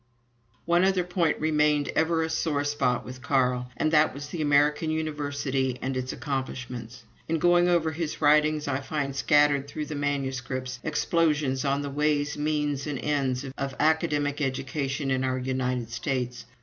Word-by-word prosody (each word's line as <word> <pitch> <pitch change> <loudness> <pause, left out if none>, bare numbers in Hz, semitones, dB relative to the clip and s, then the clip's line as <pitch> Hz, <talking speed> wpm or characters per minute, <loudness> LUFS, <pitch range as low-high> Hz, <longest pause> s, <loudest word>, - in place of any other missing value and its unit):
One 175 +1 +3
other 190 -1 +3
point 175 -3 0
remained 150 -2 +2
ever 160 0 +1
a 160 - -2
sore 155 -3 0
spot 130 -4 0
with 125 0 -9
Carl, 125 -3 +1
and 155 - +1
that 155 -3 +4
was 145 +1 -7
the 165 +1 -4
American 150 +2 +3
university 145 -4 -1
and 130 0 -3
its 130 0 -2
accomplishments. 125 -4 -5 0.2
In 165 - +1
going 175 +2 +4
over 165 -2 +2
his 160 -1 -4
writings, 150 0 +3
I 135 -1 0
find 140 -1 -3
scattered 145 -1 +3
through 150 +2 -5
the 150 - -6
manuscripts 130 -3 -3
explosions 150 -4 +1
on 140 0 0
the 140 - -4
ways, 150 0 +1
means, 150 -1 -1
and 145 -2 -2
ends, 135 -2 -1
of 135 0 -3
academic 150 -2 +1
education 135 +1 -2
in 130 0 +1
our 130 0 0
United 125 -2 -2
States. 125 -1 -3
145 Hz, 160 wpm, -27 LUFS, 130-155 Hz, 0.2 s, that